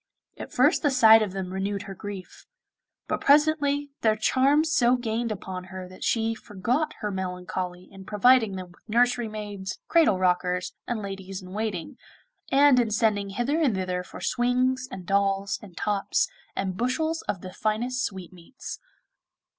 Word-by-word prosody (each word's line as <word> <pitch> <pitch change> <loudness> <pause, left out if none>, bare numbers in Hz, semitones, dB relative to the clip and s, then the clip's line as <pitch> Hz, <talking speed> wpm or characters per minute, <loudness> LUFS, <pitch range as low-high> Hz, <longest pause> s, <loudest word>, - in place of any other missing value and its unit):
At - - -8
first - - +3
the 290 - +3
sight 225 -4 +7
of 210 -3 -1
them 185 -1 -5
renewed 195 +1 -2
her 195 - -7
grief; 195 -1 -9 0.6
but - - -2
presently 290 -1 +3
their 220 -1 +3
charms 275 +8 +3
so 250 -4 +4
gained 230 -1 -2
upon 185 -3 -6
her 185 0 -8
that 185 0 -11
she 225 -1 +1
forgot 230 +8 -2
her 210 - -2
melancholy 180 -1 -4
in 195 -1 -11
providing 220 0 +4
them 185 -1 -7
with 175 - -22
nursery 240 +1 +2
maids, 205 -3 -6
cradle 325 - +4
rockers, 180 0 0
and 230 -3 -2
ladies 195 -1 -6
in 185 - -11
waiting, 205 -6 -3 0.5
and 275 -1 +6
in 235 -2 +2
sending 210 -2 +1
hither 245 +10 0
and 265 -10 +2
thither 185 -1 -2
for 180 - -11
swings 255 +1 +1
and 185 -2 -7
dolls 195 +1 +1
and 185 -4 -14
tops, 205 -1 0 0.3
and 190 -2 -2
bushels 315 +8 0
of 185 - -1
the 185 0 -8
finest 240 +5 -1
sweetmeats. 185 +4 -7
210 Hz, 160 wpm, -26 LUFS, 190-250 Hz, 0.6 s, sight